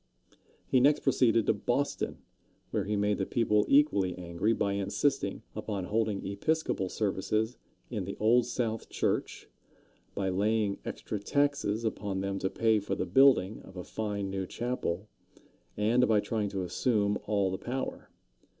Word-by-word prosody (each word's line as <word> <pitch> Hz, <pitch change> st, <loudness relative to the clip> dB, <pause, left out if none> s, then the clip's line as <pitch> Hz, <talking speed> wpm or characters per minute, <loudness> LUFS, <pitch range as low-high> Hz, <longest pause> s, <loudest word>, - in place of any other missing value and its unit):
He 130 Hz, -, +3 dB
next 145 Hz, +3 st, +4 dB
proceeded 115 Hz, -5 st, +3 dB
to -, -, +3 dB
Boston, 120 Hz, +7 st, -1 dB, 0.5 s
where 105 Hz, -, 0 dB
he 105 Hz, +1 st, -1 dB
made 105 Hz, 0 st, +1 dB
the 95 Hz, -, 0 dB
people 105 Hz, -3 st, +2 dB
equally 100 Hz, -, +3 dB
angry 85 Hz, +4 st, -1 dB
by 100 Hz, -3 st, 0 dB
insisting 100 Hz, +3 st, -1 dB
upon 105 Hz, -2 st, -3 dB
holding 105 Hz, +1 st, -1 dB
Episcopal 100 Hz, -1 st, -1 dB
services 110 Hz, +3 st, -1 dB, 0.4 s
in -, -, -2 dB
the -, -, -6 dB
Old 115 Hz, +3 st, +4 dB
South 115 Hz, -3 st, -2 dB
Church, -, -, -2 dB, 0.7 s
by 95 Hz, -1 st, 0 dB
laying 105 Hz, +2 st, +1 dB
extra 105 Hz, -, -4 dB
taxes 140 Hz, -2 st, 0 dB
upon 100 Hz, -3 st, -2 dB
them 100 Hz, 0 st, -2 dB
to 95 Hz, -, -1 dB
pay 110 Hz, 0 st, +2 dB
for 100 Hz, -, -3 dB
the -, -, -2 dB
building 130 Hz, -7 st, +4 dB
of 95 Hz, -, -13 dB
a 90 Hz, -, -5 dB
fine 100 Hz, -2 st, -3 dB
new 95 Hz, -1 st, -3 dB
chapel, 110 Hz, -6 st, -3 dB, 0.7 s
and 115 Hz, +4 st, +3 dB
by 110 Hz, -2 st, +4 dB
trying 105 Hz, 0 st, -1 dB
to 95 Hz, -1 st, -3 dB
assume 105 Hz, +2 st, +1 dB
all 100 Hz, -3 st, +1 dB
the 95 Hz, -, -3 dB
power. 130 Hz, +2 st, -4 dB
105 Hz, 150 wpm, -30 LUFS, 100-115 Hz, 0.7 s, next